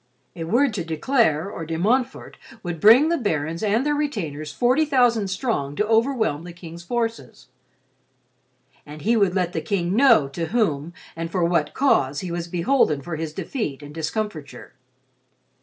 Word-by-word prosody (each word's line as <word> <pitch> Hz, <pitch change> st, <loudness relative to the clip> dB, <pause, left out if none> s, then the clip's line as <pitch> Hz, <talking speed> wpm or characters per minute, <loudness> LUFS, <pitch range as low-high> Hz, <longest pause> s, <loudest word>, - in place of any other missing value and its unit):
A 165 Hz, -2 st, -5 dB
word 240 Hz, +8 st, +2 dB
to 190 Hz, -4 st, -3 dB
De 160 Hz, -1 st, -5 dB
Clare, 195 Hz, -, +2 dB
or 195 Hz, -5 st, -6 dB
De 160 Hz, 0 st, -4 dB
Montfort 245 Hz, +8 st, 0 dB, 0.3 s
would 175 Hz, -2 st, -4 dB
bring 240 Hz, -, +7 dB
the 335 Hz, -, +1 dB
barons 165 Hz, -, -2 dB
and 220 Hz, +5 st, +1 dB
their 295 Hz, -, +1 dB
retainers 170 Hz, -, -3 dB
forty 255 Hz, -, +2 dB
thousand 245 Hz, -8 st, +2 dB
strong 190 Hz, -, -2 dB
to 210 Hz, -, 0 dB
overwhelm 225 Hz, -, +1 dB
the 175 Hz, 0 st, -9 dB
King's 170 Hz, -1 st, -10 dB
forces. 225 Hz, -, -4 dB, 1.3 s
And 150 Hz, 0 st, -11 dB
he 230 Hz, +3 st, +2 dB
would 200 Hz, -4 st, +2 dB
let 180 Hz, -2 st, 0 dB
the 160 Hz, -, -2 dB
King 175 Hz, +2 st, -1 dB
know 235 Hz, -, +5 dB
to 165 Hz, +4 st, -4 dB
whom, 170 Hz, -8 st, 0 dB, 0.2 s
and 165 Hz, 0 st, -4 dB
for 175 Hz, 0 st, 0 dB
what 170 Hz, -3 st, 0 dB
cause, 145 Hz, -, +2 dB
he 180 Hz, -, -5 dB
was 170 Hz, 0 st, -4 dB
beholden 170 Hz, -, +1 dB
for 170 Hz, +1 st, -5 dB
his 160 Hz, 0 st, -4 dB
defeat 150 Hz, -, -4 dB
and 145 Hz, 0 st, -10 dB
discomfiture. 160 Hz, 0 st, -5 dB
180 Hz, 170 wpm, -23 LUFS, 160-230 Hz, 1.3 s, bring